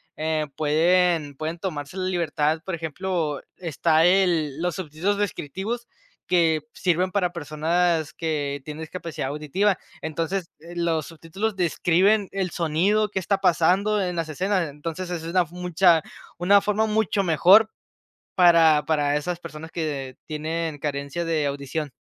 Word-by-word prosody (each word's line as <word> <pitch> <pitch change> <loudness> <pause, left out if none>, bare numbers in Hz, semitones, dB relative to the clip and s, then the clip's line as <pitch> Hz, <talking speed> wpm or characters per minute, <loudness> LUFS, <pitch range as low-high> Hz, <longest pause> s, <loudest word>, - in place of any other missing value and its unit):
eh, 155 0 -1
pueden 160 0 +2
pueden 160 +4 -4
tomarse 155 -2 -5
la 185 - -2
libertad, 160 -3 0
por 190 - -2
ejemplo, 165 -2 -3 0.2
está 165 -1 +2
el 170 -6 +2
los 175 0 -1
subtítulos 185 +3 -2
descriptivos 205 - -3 0.4
que 165 -3 +3
sirven 180 +1 0
para 180 -2 +1
personas 165 +1 0
que 145 -3 -2
tienen 150 +1 -7
discapacidad 160 -3 -5
auditiva. 155 +8 0 0.2
Entonces, 165 +3 -3
los 170 -2 -2
subtítulos 180 +6 -4
describen 185 +4 +2
el 190 -2 -2
sonido 185 +7 +1
que 190 - -1
está 195 +2 0
pasando 195 +4 +3
en 180 -2 -2
las 165 -1 -1
escenas. 180 +1 0
Entonces, 165 +5 -6
esa 170 -2 -4
es - - -4
una 180 0 +3
mucha 175 0 +2 0.4
una 195 +4 +5
forma 210 +2 +1
mucho 215 -2 +1
mejor 190 +6 +6 0.7
para 165 -4 +5
para 145 -2 +1
esas 170 +4 -2
personas 160 -1 -9
que 140 -6 -4
tienen 160 0 -3
carencia 140 +3 -3
de 160 -3 0
audición. 140 +1 -3
170 Hz, 140 wpm, -24 LUFS, 155-185 Hz, 0.7 s, mejor